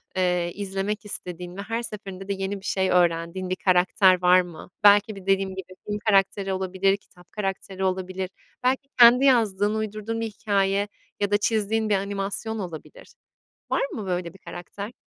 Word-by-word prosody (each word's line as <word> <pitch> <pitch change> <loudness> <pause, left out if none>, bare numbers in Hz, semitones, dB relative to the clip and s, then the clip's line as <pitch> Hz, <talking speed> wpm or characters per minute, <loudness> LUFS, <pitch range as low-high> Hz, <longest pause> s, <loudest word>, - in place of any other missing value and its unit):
eee, 180 -2 +1
izlemek 200 +1 -3
istediğin 180 -2 -3
ve 200 - -4
her 225 +3 -3
seferinde 195 -3 -7
de 200 - 0
yeni 195 +1 -3
bir - - -13
şey 190 -2 0
öğrendiğin 175 +1 +1
bir 185 - 0
karakter 185 0 +4
var 180 0 +6
mı? 175 -2 -10
Belki 205 +1 +6
bir, 195 -2 -11
dediğim 195 0 +2
gibi, 185 -1 -8
film 210 0 -3
karakteri 195 -1 +2
olabilir, 190 +1 +1
kitap 180 -3 -22
karakteri 195 -1 -4
olabilir. 185 0 -2 0.3
Belki 265 +2 0
kendi 245 +3 +8
yazdığın, 215 -5 +3
uydurduğun 220 +1 -3
bir - - -1
hikâye 200 -1 0 0.3
ya 205 0 0
da 205 - +5
çizdiğin 220 0 0
bir 205 - +4
animasyon 200 +3 -3
olabilir. 185 - -9 0.6
Var - - +1
mı 215 -4 -5
böyle 180 -2 -2
bir - - -15
karakter? 200 +5 -8
195 Hz, 165 wpm, -25 LUFS, 185-210 Hz, 0.6 s, kendi